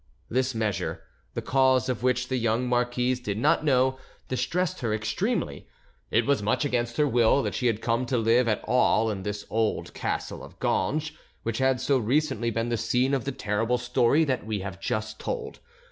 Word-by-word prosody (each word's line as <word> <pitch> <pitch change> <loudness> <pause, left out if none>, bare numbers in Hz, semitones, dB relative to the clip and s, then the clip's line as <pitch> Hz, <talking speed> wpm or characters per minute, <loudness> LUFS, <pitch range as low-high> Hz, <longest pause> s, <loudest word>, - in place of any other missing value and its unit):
This 130 0 0
measure, 110 -4 -2 0.3
the - - -3
cause 130 -2 +3
of 125 -3 -2
which 125 0 +1
the 130 - -1
young 115 +1 0
marquise 125 +1 +1
did 105 -5 -3
not 150 +7 +2
know, 130 -2 +2 0.3
distressed 170 +7 -1
her 115 -3 -1
extremely. 110 0 -2 0.4
It 115 +1 +2
was 140 -5 +2
much 110 +8 +1
against 120 -3 -1
her 150 - +3
will 120 +2 +3
that - - -2
she 125 - 0
had 115 -2 -1
come 120 +2 0
to 125 - 0
live 115 +2 +3
at 110 - 0
all 115 -3 +3
in 100 -2 -4
this 105 +1 -4
old 110 0 -1
castle - - -3
of - - -13
Ganges, 155 +1 0 0.3
which 115 +1 -2
had 130 -1 +2
so 135 0 +2
recently 125 -1 +1
been 115 +1 -1
the 120 - 0
scene 125 +4 +1
of 135 -3 0
the 140 - -1
terrible 115 0 0
story 125 +5 +2
that 130 -5 -1
we 105 -2 -3
have 95 -1 -6
just 110 +1 -3
told. 450 -2 -4
125 Hz, 190 wpm, -26 LUFS, 110-130 Hz, 0.4 s, cause